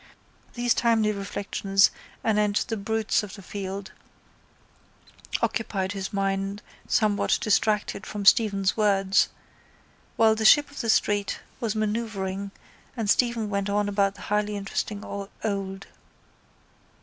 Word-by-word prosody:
These 240 -1 +2
timely 225 -3 +2
reflections 195 0 +1 0.3
anent 210 -2 +2
the 225 - -2
brutes 220 +1 0
of 205 -2 -8
the 200 - -12
field 195 0 -6 1.5
occupied 220 -4 -1
his 195 -1 -4
mind 195 0 -2 0.2
somewhat 210 -2 +2
distracted 210 -1 0
from 205 -1 -5
Stephen's 200 -3 +4
words 200 -2 +3 0.9
while 220 -1 +5
the 220 0 -2
ship 290 +6 +6
of 285 - -6
the 230 - -3
street 205 -2 +1 0.2
was 225 -2 -2
manœuvring 205 -3 -2 0.5
and 215 -3 +1
Stephen 235 -3 +1
went 200 -1 -2
on 205 0 +1
about 200 -1 +1
the - - -13
highly 210 0 -1
interesting 200 +1 -4
old. 195 -1 -5
205 Hz, 120 wpm, -26 LUFS, 195-220 Hz, 1.5 s, ship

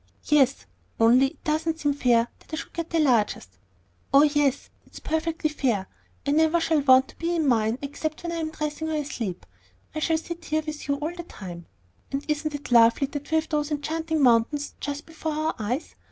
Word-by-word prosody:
"Yes; 280 -3 +3 0.3
only 240 +4 +6
it 290 - -13
doesn't 315 0 -1
seem 290 -1 +2
fair 240 -4 +3
that - - -22
I - - -2
should 315 - -7
have 335 -1 -3
the 335 - 0
largest." 215 - +1 0.5
"Oh, 275 +2 +7
yes; 290 -2 +1
it - - -26
is - - -7
perfectly 320 0 -1
fair. 240 -10 0 0.4
I 285 - +1
never 320 +3 +3
shall 320 -2 +2
want 260 -1 +5
to - - -15
be 340 +1 -1
in 320 -3 +1
mine 225 -2 +2
except 305 +3 -4
when 340 - -3
I 340 - -3
am 320 -1 -2
dressing 310 0 -4
or 315 - -1
asleep. 235 - -4 0.5
I 310 - -3
shall 320 +1 +1
sit 335 +1 -7
here 310 +1 0
with 305 -2 -6
you 280 - +1
all 300 +4 -3
the 350 - -5
time; 180 - -9 0.4
and 275 +1 -3
isn't 300 0 -1
it 290 -3 -8
lovely 235 +3 +6
that 290 +1 -7
we 320 - +1
have 320 0 +1
those 300 -1 0
enchanting 315 +1 -1
mountains 250 +4 +3
just 290 0 -4
before 320 -1 -4
our 310 +1 -1
eyes? 240 +8 -3
295 Hz, 210 wpm, -25 LUFS, 260-315 Hz, 0.5 s, Oh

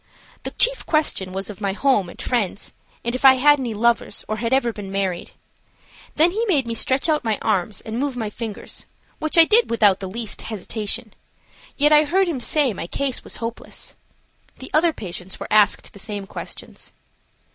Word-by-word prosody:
The - - -4
chief - - +2
question 300 - 0
was 195 +2 -4
of 210 - -13
my 200 -2 0
home 210 -6 +2
and - - -13
friends, 215 -6 -2 0.3
and 235 - 0
if 255 - -4
I 265 -1 +9
had 290 +3 +5
any 240 -4 -3
lovers 235 +2 0
or 215 - -2
had 230 +2 -2
ever 260 -3 +2
been 200 -2 -7
married. 190 -3 -2 0.9
Then 330 +3 +4
he 435 +5 -1
made 295 - +2
me 230 - -3
stretch 260 +6 +1
out 305 -2 +1
my 220 -3 0
arms 200 -1 0
and 225 +2 -5
move 275 -2 -2
my 220 -3 -3
fingers, 220 -1 -6 0.3
which 310 +2 -1
I 330 - +9
did 455 +6 +4
without 210 -4 +4
the 190 -2 -5
least 225 +1 -3
hesitation, 215 +1 -4 0.6
yet 295 +1 +4
I 300 0 +6
heard 375 +5 +2
him 320 -6 -2
say 275 -1 +1
my 170 - -6
case 270 +5 -2
was - - -5
hopeless. 230 0 -6 0.6
The 260 - -10
other 325 +2 +4
patients 185 - -7
were - - -5
asked 210 -2 +3
the 200 - -12
same 205 -1 -5
questions. - - -8
230 Hz, 190 wpm, -22 LUFS, 205-285 Hz, 0.9 s, I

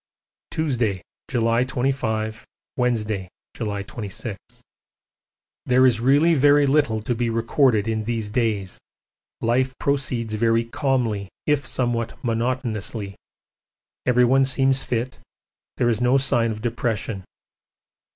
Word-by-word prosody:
Tuesday, 120 - -1 0.3
July 115 -1 +2
25, 115 -4 -2 0.3
Wednesday, 110 -6 -1 0.3
July 105 -3 -3
26. 105 0 -6 1.3
There 130 +1 +5
is 120 -4 +3
really 145 +7 +4
very 145 0 +5
little 135 -6 +2
to 115 +3 -1
be 120 0 -1
recorded 115 -1 +2
in 110 -1 -1
these 115 -2 -2
days, 105 -5 -1 0.6
life 130 +3 +1
proceeds 125 -5 -1
very 115 +1 +2
calmly 115 -6 -1 0.2
if 145 -4 +1
somewhat 120 -1 -1
monotonously. 115 -4 -2 0.9
Everyone 125 +2 +4
seems 135 0 +2
fit, 125 +2 -3 0.6
there 120 - +2
is 115 -1 +1
no 125 +2 +4
sign 120 -4 +3
of 110 0 -5
depression. 115 -4 -2
120 Hz, 110 wpm, -23 LUFS, 110-130 Hz, 1.3 s, There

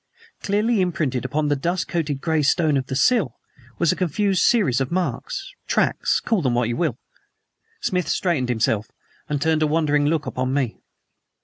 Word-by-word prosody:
Clearly 210 +2 +1
imprinted 155 -9 -1
upon 150 +3 0
the 145 - +2
dust 170 +6 -1
coated 150 -5 -2
gray 160 -2 +1
stone 155 +1 +2
of 130 -2 -1
the 130 - -3
sill 150 - +2 0.4
was 170 -2 +3
a - - -1
confused 190 +3 0
series 180 - +3
of 135 - -1
marks 185 - -3
tracks - - +1
call 225 -6 0
them 130 -5 +1
what 120 -1 +1
you 120 - -1
will. 155 -7 -1 0.8
Smith 180 -6 -1
straightened 155 -9 0
himself 115 -2 0 0.4
and 145 -1 0
turned 160 +1 +1
a 155 - +3
wondering 150 -2 +2
look 155 0 0
upon 130 +1 -2
me. 130 -5 -1
155 Hz, 175 wpm, -22 LUFS, 130-180 Hz, 0.8 s, was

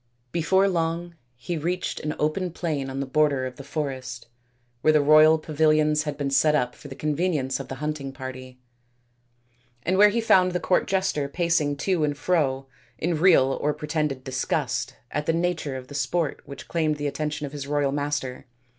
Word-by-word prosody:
Before 190 +4 +3
long 170 -1 -1 0.2
he 155 +8 -4
reached 180 +4 -2
an 150 0 -3
open 165 +5 0
plain 155 -5 -3
on 135 +1 -3
the - - -2
border 140 -1 +2
of 130 -1 -7
the 140 - -8
forest, 130 -5 -4 0.6
where 155 - +5
the 155 - +4
royal 155 +2 +6
payilions 155 0 +2
had 145 -2 -3
been 140 -2 -2
set 150 +3 +4
up 125 -4 0
for 145 - -12
the 135 - -8
convenience 150 -3 -1
of 135 - -6
the 135 - -6
hunting 150 -1 -4
party, 130 -1 -8 1.3
and 185 +3 +1
where 210 0 +8
he 230 +3 0
found 185 -5 +4
the 180 - 0
court 175 +2 +1
jester 190 -7 0
pacing 165 -2 +1
to 175 +2 0
and 145 -1 0
fro 140 -6 0 0.3
in 165 -1 -1
real 160 -7 +5
or 150 0 0
pretended 150 -3 -2
disgust 130 -1 -2 0.2
at 150 0 -3
the 165 - +3
nature 165 -5 -1
of 130 -1 -9
the 145 - -11
sport 145 +3 -1
which 140 - -10
claimed 155 -3 0
the 145 0 -5
attention 150 +1 -2
of 140 - -7
his 140 -1 -6
royal 145 -1 +1
master. 145 -3 -3
150 Hz, 185 wpm, -25 LUFS, 140-165 Hz, 1.3 s, where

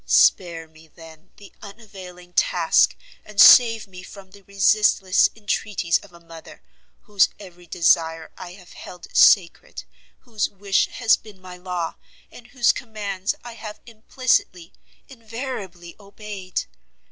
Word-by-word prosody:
Spare 170 -3 +2
me, 160 0 -20
then, 160 +2 -17
the 205 - -16
unavailing 190 -4 -13
task; - - +2 0.3
and 210 -1 -10
save 230 -2 +7
me 180 -1 -12
from 190 0 -14
the 200 +1 -17
resistless 200 -1 +2
entreaties 205 -5 -2
of 205 - -18
a 170 - -17
mother, 165 -1 -15 0.4
whose 205 -3 +1
every 180 -3 -15
desire 165 -1 0
I 175 - -10
have 180 -1 -17
held 180 -1 -13
sacred, 180 -5 +3 0.4
whose 225 -5 -3
wish 195 0 -1
has 225 -3 +2
been 210 -3 -17
my 185 -1 -12
law, 180 -2 -5 0.3
and 240 - -15
whose 245 -2 +2
commands 205 -4 -5
I 240 -1 -10
have 215 -2 -10
implicitly, 220 -6 -2 0.3
invariably 225 -8 -9
obeyed! 200 -2 -7
195 Hz, 130 wpm, -21 LUFS, 175-215 Hz, 0.4 s, save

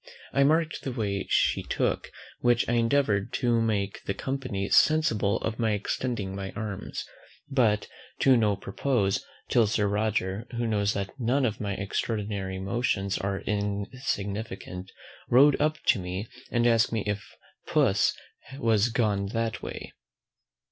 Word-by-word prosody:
I 140 - +4
marked 160 +3 +2
the 135 - -3
way 100 -5 -2
she - - +3
took, - - -1 0.3
which 120 -1 +3
I 120 - 0
endeavoured 115 -4 +2
to 120 -2 +2
make 100 -3 -1
the 100 - -2
company 130 -8 -3
sensible 135 -10 +4
of 115 +2 -3
by 110 -2 +2
extending 105 -1 -2
my 95 -1 -4
arms; 105 -3 -5 0.5
but 110 -6 +2 0.3
to 135 -1 +6
no 105 -4 +3
purpose, 100 0 0 0.2
till 115 -3 +4
Sir 105 0 +1
Roger, 105 0 -1
who 120 - 0
knows 105 -2 +1
that 100 -1 -3
none 130 +3 +2
of 110 -3 -2
my 100 -1 -1
extraordinary 100 -1 -2
motions 100 -1 -1
are 95 0 -2
insignificant, 100 -2 -3 0.4
rode 140 +4 +6
up 155 +1 +2
to 105 - +5
me, 95 +3 -4 0.2
and 120 -1 +1
asked 115 -1 +4
me 110 -3 -1
if 105 0 -2 0.4
PUSS 125 -10 +3 0.4
was 115 -4 +3
gone 105 -4 +1
that 115 -1 -1
way? - - -7
110 Hz, 140 wpm, -27 LUFS, 100-120 Hz, 0.5 s, to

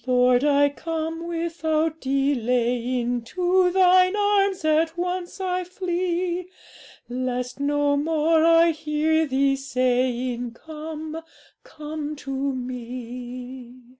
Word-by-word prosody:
'Lord, 250 0 +4
I 285 -1 +4
come 325 +2 -4
without 325 -2 -1
delaying, 245 -2 0
To 360 +8 +2
Thine 370 +1 +5
arms 400 -3 +1
at 320 +2 +2
once 360 +1 -3
I 365 -1 -1
flee, 360 -1 -2 0.6
Lest 250 +1 -3
no 290 0 +1
more 315 +1 +2
I 330 0 +6
hear 315 0 0
Thee 275 0 +2
saying, 250 -2 -1
"Come, 315 +3 -7 0.4
come 300 0 -6
to 280 -2 -8
Me."' 250 -1 -5
300 Hz, 100 wpm, -24 LUFS, 255-335 Hz, 0.6 s, I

